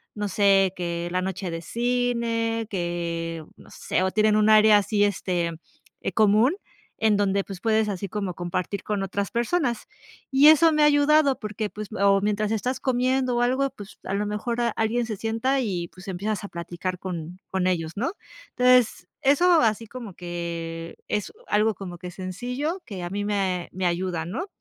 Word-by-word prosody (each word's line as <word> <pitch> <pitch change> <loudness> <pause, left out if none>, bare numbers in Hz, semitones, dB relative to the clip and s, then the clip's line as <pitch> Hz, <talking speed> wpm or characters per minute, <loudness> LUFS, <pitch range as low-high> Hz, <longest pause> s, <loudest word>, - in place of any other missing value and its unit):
No 210 -1 -2
sé 195 -2 +4
que 170 -1 -3
la 185 +1 0
noche 190 -1 -3
de 165 0 -4
cine, 235 0 -1
que 170 -3 -3
no - - -16
sé, - - -1
o 190 - +1
tienen 215 +1 +3
un 215 0 +4
área 215 0 +7
así, 205 0 +1
este, 180 -4 -1 0.5
eh, - - -2
común, 220 - +4 0.4
en 220 -2 +3
donde, 200 -1 +1
pues, 190 -2 -9
puedes 220 -1 +2
así 200 0 -3
como 200 -2 -3
compartir 180 +3 -3
con 210 -2 -2
otras 200 +1 -3
personas. 240 +1 0 0.4
Y 275 +3 +7
eso 320 +1 +6
me 305 0 +3
ha - - +7
ayudado, 290 -1 +4
porque, 215 0 -4
pues, 215 +1 -7
o 195 0 +4
mientras 210 +1 0
estás 250 +4 -1
comiendo 255 0 +1
o - - +2
algo, 260 +3 +2
pues, 210 -6 -12
a 190 - -4
lo 205 +1 0
mejor 230 +3 -2
a 235 - +2
alguien 225 +3 0
se 220 -3 -5
sienta 225 +6 0
y, 180 -7 -2
pues, 185 0 -14
empiezas 200 +3 -3
a 200 - -6
platicar 175 +1 -5
con 180 -1 -6
con 190 -1 -1
ellos, 165 -3 -1
¿no? 255 +10 0 0.5
Entonces, 250 -7 +4
eso 325 +5 +5
así 225 0 +1
como 235 -3 -8
que 170 -1 -5
es 210 - -2
u - - -31
algo 215 +1 +2
como 180 -2 -8
que 180 0 -7
sencillo 250 - -4
que 195 -6 -7
a 175 - -4
mí 200 +2 -3
me 190 -4 -1
me 185 0 -2
ayuda, 175 -1 -1
¿no? 330 - -4
205 Hz, 185 wpm, -25 LUFS, 185-235 Hz, 0.5 s, área